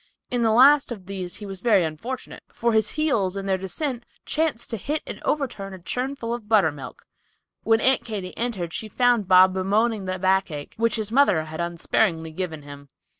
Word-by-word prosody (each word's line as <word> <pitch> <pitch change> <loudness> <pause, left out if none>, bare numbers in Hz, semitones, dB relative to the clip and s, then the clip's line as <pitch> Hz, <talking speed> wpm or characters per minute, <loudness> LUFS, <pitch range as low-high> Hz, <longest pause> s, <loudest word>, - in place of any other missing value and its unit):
In 245 -1 +1
the 225 - +3
last 270 +4 +6
of 200 -6 -7
these 185 -2 -6
he 210 - -9
was 195 -2 -7
very 210 -6 +4
unfortunate, 165 +12 -6
for 235 0 0
his 220 -1 +2
heels, 210 -12 +1
in 195 - -4
their 190 -1 0
descent, 240 - -3 0.2
chanced 310 -7 -1
to 225 - -2
hit 295 +9 -3
and - - -8
overturn 215 -10 -2
a - - -12
churn 250 +10 -3
full 230 -4 -4
of 230 -3 -7
buttermilk! 190 -11 0 0.6
When 225 +1 +2
Aunt 265 0 +3
Katy 200 -5 -6
entered 195 -9 -3
she 220 - -4
found 245 -4 +2
Bob 185 0 +6
bemoaning 205 +3 0
the 185 0 -2
backache, 185 -6 0
which 230 +1 +1
his 215 -2 -2
mother 235 - +4
had 160 +1 -6
unsparingly 170 -1 0
given 160 -3 -5
him! 140 0 -11
205 Hz, 190 wpm, -24 LUFS, 185-235 Hz, 0.6 s, last